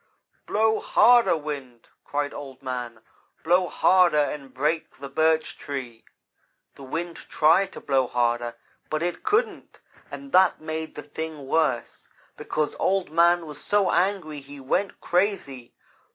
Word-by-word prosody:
"'Blow 220 +1 +2
harder, 240 -7 +5
wind!' 140 -6 -7 0.2
cried 145 0 -2
Old 135 -2 -9
man, 120 -3 -5 0.4
'blow 180 +2 +3
harder 180 -4 +4
and 145 -2 -1
break 150 +5 -2
the 140 0 -8
Birch 160 +2 +1
Tree.' 130 -5 -6 0.7
The - - -15
wind 165 +5 -5
tried 165 +5 +2
to - - -9
blow 135 -2 +1
harder, 120 -1 0 0.3
but 155 +1 -1
it 175 0 -2
couldn't, 430 +3 -1 0.3
and 275 0 -9
that 185 -1 +4
made 155 0 -5
the 150 - -7
thing 155 0 -7
worse, 135 -5 -1 0.3
because 150 -1 -2
Old 190 -4 0
man 170 +1 +4
was 150 -2 -9
so 205 -2 +2
angry 180 -6 0
he 140 +1 -12
went 160 +9 -1
crazy. 175 - -1
155 Hz, 135 wpm, -25 LUFS, 135-175 Hz, 0.7 s, harder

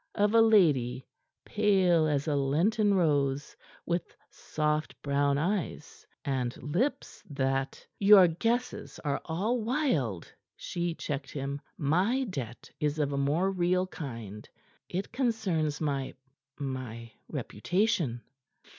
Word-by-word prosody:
of 205 0 +2
a 230 - +7
lady 145 - +4 0.4
pale 190 -6 +3
as 145 0 0
a 150 - +1
lenten 195 +10 +2
rose, 145 -5 +1 0.3
with 170 0 -2 0.2
soft 150 0 -2
brown 140 0 +2
eyes, 175 -1 -3 0.2
and 130 -3 -1
lips 230 - -2
that 135 -1 -2
" - - -48
"Your 195 -4 +10
guesses 230 +9 -2
are 145 - 0
all 210 +9 -1
wild," 215 - -1 0.2
she 175 -1 -3
checked 140 -4 -4
him. 140 0 -4 0.2
"My 185 - +2
debt 135 - -6
is 150 0 0
of 145 -2 0
a - - -1
more 155 +8 +1
real 180 0 +1
kind. 115 - -8 0.4
It 190 +3 -3
concerns 205 - 0
my 140 -3 -2 0.4
my 125 -4 -5 0.2
reputation." 175 - -1
155 Hz, 120 wpm, -29 LUFS, 140-195 Hz, 0.4 s, Your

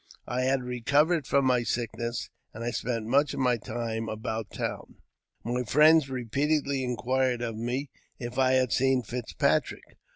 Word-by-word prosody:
I 125 +2 -2
had 130 0 +1
recovered 140 +6 +1
from 140 -1 +3
my 125 -2 +3
sickness, 120 0 -3 0.2
and 115 - -6
I 120 - -1
spent 115 -1 -2
much 140 +5 +2
of - - -5
my 125 -2 +2
time 115 0 -4
about 110 0 -4
town. - - -5 0.5
My 120 +2 -1
friends 150 +5 +5
repeatedly 135 +3 0
inquired 125 0 0
of 115 -2 -3
me 125 +5 -3 0.3
if 120 +1 -5
I 130 0 +4
had 130 -2 +2
seen 130 -1 +2
Fitzpatrick. 120 +1 -1
125 Hz, 155 wpm, -28 LUFS, 115-135 Hz, 0.5 s, friends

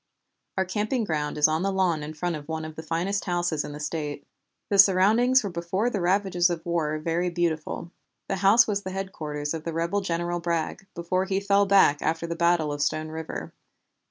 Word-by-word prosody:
"Our 190 - +2
camping 215 +6 -1
ground 150 -6 -2
is 150 - +5
on 155 +1 0
the 195 +1 0
lawn 185 -5 +1
in 150 +1 -7
front 175 +2 -2
of 145 -1 -8
one 160 -1 -4
of 155 0 -8
the 160 - -6
finest 170 +5 -2
houses 175 -4 0
in - - -7
the 145 - -8
State. 150 -1 -4 0.4
The 200 - +1
surroundings 215 +7 +5
were 200 - -3
before 180 +7 -1
the 200 - -2
ravages 180 -1 +2
of 170 -1 -4
war 160 -3 0
very 165 +3 -1
beautiful. 170 -1 -2 0.4
The 195 - -1
house 200 +5 +6
was 205 -2 -1
the 190 - -6
headquarters 155 -6 -4
of 160 -1 -5
the 165 - -4
rebel 170 +5 0
General 175 -1 -2
Bragg, 170 +2 -2
before 185 +2 -1
he 190 0 0
fell 200 0 +2
back 195 -7 +5
after 165 +1 -1
the 170 0 -4
battle 170 -3 +2
of 145 - -4
Stone 155 +1 -1
River. 160 0 -6
175 Hz, 205 wpm, -26 LUFS, 160-195 Hz, 0.4 s, house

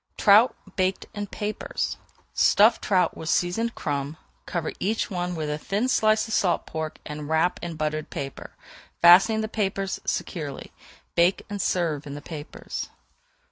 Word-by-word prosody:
TROUT 215 +5 +6 0.2
BAKED 185 0 0
IN 205 -1 -4
PAPERS 210 +2 -3 0.4
Stuff 220 +3 +5
trout 185 -3 +2
with 160 - -6
seasoned 225 +9 0
crumbs, 145 +1 -3 0.3
cover 170 -3 -2
each 220 +3 -1
one 180 -1 -2
with 155 -2 -3
a 150 0 -2
thin 205 +9 -1
slice 215 -3 +3
of 220 - -4
salt 180 -3 +1
pork, 160 -1 -5
and 150 0 -6
wrap 160 +3 +2
in 170 -1 -5
buttered 155 0 -2
paper, 135 -1 -7 0.5
fastening 195 +6 +7
the 220 - -2
papers 195 -3 -2
securely; 150 -6 -4 0.4
bake 175 +3 +2
and 205 -1 -2
serve 160 -5 -1
in 140 - -6
the 145 - -7
papers. 150 -2 -7
175 Hz, 150 wpm, -25 LUFS, 155-205 Hz, 0.5 s, fastening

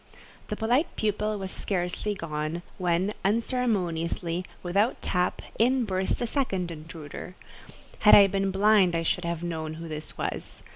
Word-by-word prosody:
The 210 - -3
polite 240 +9 +1
pupil 210 0 0
was 190 -1 -5
scarcely 185 +2 -2
gone, 155 0 -3 0.2
when, 180 +3 +1
unceremoniously, 185 -7 0 0.2
without 200 +6 +1
tap, 180 -1 0 0.2
in 250 +2 +3
burst 190 -2 -1
a - - +1
second 195 - -1
intruder. 160 +2 -8 0.6
Had 210 - +8
I 200 - +9
been 195 0 0
blind 195 -2 +4
I 165 - 0
should 180 +1 0
have 170 0 -2
known 160 -2 -3
who 165 +1 -7
this 155 -1 -6
was. - - -5
185 Hz, 145 wpm, -27 LUFS, 170-210 Hz, 0.6 s, I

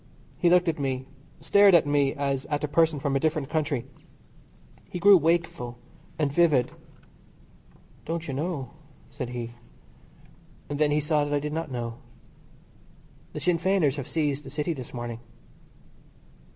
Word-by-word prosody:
He 175 - +4
looked 180 0 +4
at 160 -2 0
me, 130 -2 -2 0.4
stared 200 +3 +6
at 165 - +5
me 145 -1 +2
as 140 -1 -2
at 145 +1 -2
a - - +1
person 160 0 +2
from 140 -1 -1
a - - +3
different 155 -2 -1
country. 150 -6 -1 1.0
He - - -5
grew 200 +3 +7
wakeful 165 -8 0 0.4
and 145 -3 0
vivid. 150 -7 +3 1.3
"Don't 165 +1 -3
you 140 - -3
know," 140 -3 -3 0.4
said 130 -3 -5
he. 120 -1 -5 1.2
And 145 0 -3
then 150 -1 +3
he 150 +1 +2
saw 150 0 +1
that 145 0 -1
I - - +2
did 150 +1 -4
not 160 -1 -3
know. 120 -2 -5 1.3
"The - - -4
Sinn 175 -2 +1
Feiners 175 -7 +2
have 140 - -5
seized 150 -3 -1
the 135 - -9
City 150 +4 -2
this 130 -5 -8
morning." 120 -2 -5
145 Hz, 155 wpm, -26 LUFS, 135-165 Hz, 1.3 s, grew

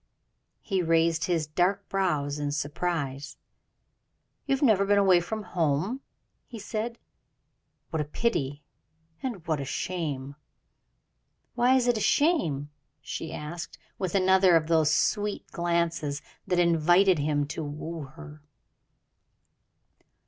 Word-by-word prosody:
He 195 -3 0
raised 165 -1 +2
his 170 -3 0
dark 185 +6 0
brows 150 -7 -1
in 145 -1 -2
surprise. 145 -1 -3 1.1
"You 275 - +3
have 270 - -3
never 215 -7 +5
been 205 +1 +3
away 190 -3 +5
from 215 +5 -4
home?" 175 - -1 0.5
he 235 - -9
said; 225 +2 -4 0.9
"what 160 - 0
a - - -2
pity, 145 - -2 0.6
and 225 -11 -5
what 155 -4 0
a - - -2
shame!" 140 -2 -3 1.2
"Why 245 +2 +4
is 250 -2 +2
it 240 -2 +3
a - - -4
shame?" 170 - +1 0.3
she 160 - -6
asked, 165 +3 -6 0.2
with 185 -1 -2
another 190 -1 +5
of 160 -1 +3
those 160 -2 +3
sweet 205 +6 0
glances 170 -4 -1 0.2
that 180 - +1
invited 175 +1 +4
him 145 0 +1
to 160 - -4
woo 155 +2 -6
her. 150 +2 -12
170 Hz, 125 wpm, -27 LUFS, 150-195 Hz, 1.2 s, never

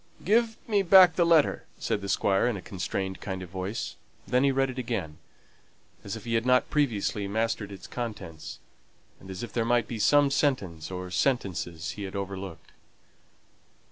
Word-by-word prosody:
"Give 225 +3 +3
me 210 -3 +3
back 185 -1 +8
the 170 -2 +3
letter," 165 -3 +3
said 100 - -1
the 100 - -5
Squire, 95 +4 +2
in 120 -4 0
a - - -7
constrained 95 0 -4
kind 95 -2 -4
of 90 - -10
voice. 95 +3 -4 0.3
Then 125 +1 +2
he 140 - +4
read 135 0 +1
it 130 - -6
again, 100 -11 -3 0.8
as 100 - -5
if 110 - -9
he 115 - -2
had 115 0 +2
not 125 0 +3
previously 110 -8 0
mastered 110 0 -1
its 100 - -9
contents, 105 -10 -6 0.6
and 95 - -13
as 95 +3 -6
if 115 -3 -7
there 115 - +1
might 120 -1 +2
be 115 - -5
some 145 +5 +4
sentence 95 - 0
or 90 -1 -6
sentences 90 - -1
he 105 - -7
had 95 +1 -7
overlooked. 95 -4 -6
110 Hz, 175 wpm, -28 LUFS, 95-130 Hz, 0.8 s, back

